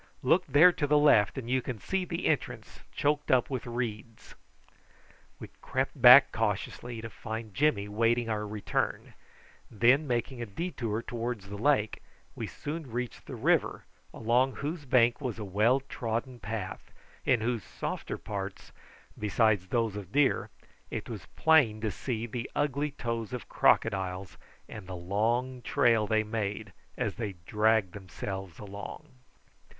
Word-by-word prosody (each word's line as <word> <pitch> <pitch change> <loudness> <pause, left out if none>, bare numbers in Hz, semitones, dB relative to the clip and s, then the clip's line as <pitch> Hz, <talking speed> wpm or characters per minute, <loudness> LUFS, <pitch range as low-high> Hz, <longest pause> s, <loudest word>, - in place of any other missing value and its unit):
"Look 175 +8 +3
there 165 +5 +7
to 145 -4 -2
the 150 +1 +4
left, 140 -9 +4
and 125 -3 -5
you 130 +1 +1
can 125 -1 -5
see 190 - -2
the 170 0 -4
entrance 155 - -2
choked 145 0 0
up 130 +1 +3
with 130 -2 -3
reeds." 115 -2 -5 1.1
We - - -9
crept 130 +1 -2
back 125 +3 +10
cautiously, 110 +2 -3
to 115 - -6
find 110 0 -6
Jimmy 105 -3 +2
awaiting 115 +3 +1
our 105 -1 -2
return; 105 -1 -2 0.6
and 110 - -16
then 130 +7 +5
making 120 0 -2
a 120 - -4
detour 115 - -3
towards 115 -4 -4
the 100 - -6
lake, 115 -4 +1 0.3
we - - -5
soon 155 -1 -6
reached 120 -1 -5
the - - -6
river, - - +1 0.3
along 125 +4 +1
whose 150 +1 -4
bank 120 0 +3
was 125 -6 -3
a 105 - -5
well 110 +8 +2
trodden 120 -1 -4
path, 105 -4 -6 0.3
in 120 -3 +2
whose 115 -2 -1
softer - - -5
parts, - - -6 0.5
besides 105 -2 +2
those 115 -1 0
of 100 -3 -7
deer, 140 -1 +2 0.4
it - - -5
was - - -7
plain 145 -10 +4
to 110 -1 -1
see 115 +2 -3
the 120 +1 -5
ugly 145 0 0
toes 115 -4 -4
of 125 - -5
crocodiles, 95 -3 +1 0.3
and 105 -4 -9
the 95 - -6
long 115 +8 -1
trail 115 -1 +3
they 110 0 +2
made 105 -2 -4 0.2
as - - -1
they 105 -4 -3
dragged 105 -2 +2
themselves 95 -2 -6
along. 100 -1 -8
115 Hz, 150 wpm, -29 LUFS, 105-130 Hz, 1.1 s, back